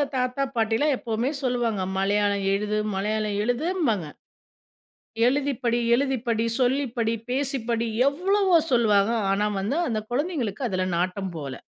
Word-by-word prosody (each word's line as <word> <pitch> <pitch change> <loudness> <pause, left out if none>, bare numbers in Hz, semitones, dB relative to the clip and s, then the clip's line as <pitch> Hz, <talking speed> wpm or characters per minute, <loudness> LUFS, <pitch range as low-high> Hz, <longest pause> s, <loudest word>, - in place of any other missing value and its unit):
தாத்தா 255 +1 0
பாட்டிலாம் 225 +6 +2
எப்பவுமே 235 +3 -2
சொல்லுவாங்க, 240 -6 0
மலையாளம் 200 0 +1
எழுது 210 +1 -1 0.2
மலையாளம் 210 +1 -1
எழுதும்பாங்க, 245 - 0 1.2
எழுதி 280 +1 0
படி 235 0 +2 0.2
எழுதி 265 +1 +1
படி, 225 0 +1 0.2
சொல்லி 265 +3 +2
படி, 225 0 +1 0.2
பேசிப்படி, 245 -4 -1 0.2
எவ்வளவோ 375 +5 +2 0.2
சொல்வாங்க, 215 -3 +3 0.2
ஆனா 205 +2 +1
வந்து 250 - -1
அந்த 220 -2 -1
குழந்தைகளுக்கு, 255 - -2
அதில 185 -1 -1
நாட்டம் 185 +1 -2
போல. 140 -3 -5
230 Hz, 125 wpm, -25 LUFS, 205-270 Hz, 1.2 s, சொல்வாங்க